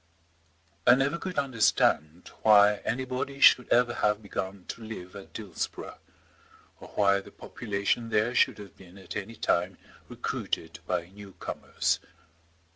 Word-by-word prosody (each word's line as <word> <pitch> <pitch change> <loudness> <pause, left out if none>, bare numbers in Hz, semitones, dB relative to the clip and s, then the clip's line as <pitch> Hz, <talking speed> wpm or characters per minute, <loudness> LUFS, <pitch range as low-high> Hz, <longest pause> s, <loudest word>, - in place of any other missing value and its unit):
I 125 - +9
never 140 +5 0
could 185 -2 -6
understand 105 - +1
why 105 -1 +6
anybody 130 +4 -3
should 125 -2 +6
ever 120 0 +3
have 105 -1 0
begun 95 -2 -5
to 115 - -6
live 95 -5 -8
at 100 - -11
Dillsborough, 100 -7 -6 0.8
or - - -11
why 100 -1 +4
the - - -13
population 105 +2 -3
there 110 +2 +1
should - - +3
have 100 -4 -11
been 95 0 -15
at 95 - -9
any 105 +3 -5
time 90 -2 0 0.3
recruited 80 0 -4
by 90 -2 -1
new 100 0 -12
comers. - - -2
105 Hz, 135 wpm, -28 LUFS, 95-120 Hz, 0.8 s, I